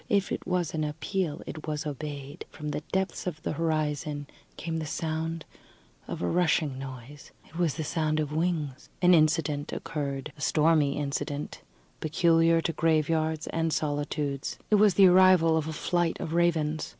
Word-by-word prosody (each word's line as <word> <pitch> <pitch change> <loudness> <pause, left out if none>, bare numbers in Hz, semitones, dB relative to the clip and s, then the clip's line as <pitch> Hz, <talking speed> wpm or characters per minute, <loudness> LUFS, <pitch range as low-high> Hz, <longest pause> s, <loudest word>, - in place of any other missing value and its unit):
If 200 -1 +1
it - - -4
was 180 -3 0
an 155 -1 -1
appeal, 155 +2 -2
it 155 0 -8
was 150 0 -2
obeyed. 145 -1 -6
From 150 -1 -6
the 150 0 -3
depths 190 -1 -1
of 160 -3 -3
the - - -1
horizon 150 -2 -1 0.3
came 165 0 -3
the 160 -1 -3
sound 160 +1 -3 0.6
of - - -5
a - - +1
rushing 155 - +1
noise. 135 +1 -9 0.2
It - - -19
was 170 -5 +1
the 160 - -3 0.2
noise 155 0 +1
of 150 -1 -2
wings. 155 -4 -2
An 180 0 +7
incident 155 -2 +2
occurred, 140 -2 -4
a 150 - -14
stormy 150 -2 +3
incident, 145 0 -3 0.4
peculiar 165 +1 +3
to 165 - -1
graveyards 160 0 +1
and 165 0 0
solitudes. 145 -2 -2
It - - +7
was 205 -4 +5
the 195 - +7
arrival 180 -3 +6
of 160 -1 0
a - - -3
flight 175 +2 0
of 160 - -4
ravens. 160 -3 +1
155 Hz, 165 wpm, -28 LUFS, 150-165 Hz, 0.6 s, An